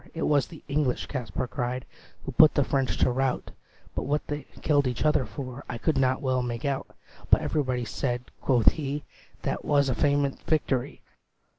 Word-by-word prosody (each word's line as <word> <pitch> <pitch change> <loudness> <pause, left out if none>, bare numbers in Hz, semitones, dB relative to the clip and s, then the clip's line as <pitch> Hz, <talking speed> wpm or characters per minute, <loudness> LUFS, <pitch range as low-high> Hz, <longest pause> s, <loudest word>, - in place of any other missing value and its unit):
"It 165 - -2
was 145 -2 +3
the 160 - -12
English," 140 -3 0
Kaspar 130 -1 -3
cried, 125 +2 -3 0.4
"Who 135 - -3
put 155 +5 +6
the 145 - +4
French 135 -1 0
to - - +3
rout; 130 +1 -1 0.4
But - - -3
what 150 +1 0
they 145 0 -5 0.2
killed 145 -3 +3
each 125 +4 -2
other 150 -5 +3
for 130 +1 -7
I 125 - -3
could 155 +6 +1
not 130 0 +2
well 130 -1 +1
make 120 0 -3
out. 140 -1 -1 0.4
But - - +6
everybody 130 -5 0
said," 125 +1 -2 0.2
quoth 125 -4 +5
he, 145 -1 -4 0.4
"That - - -1
't - - -15
was 140 -2 +3
a - - +2
famous 140 +1 +1
victory. 140 -5 -1
135 Hz, 185 wpm, -27 LUFS, 125-145 Hz, 0.4 s, put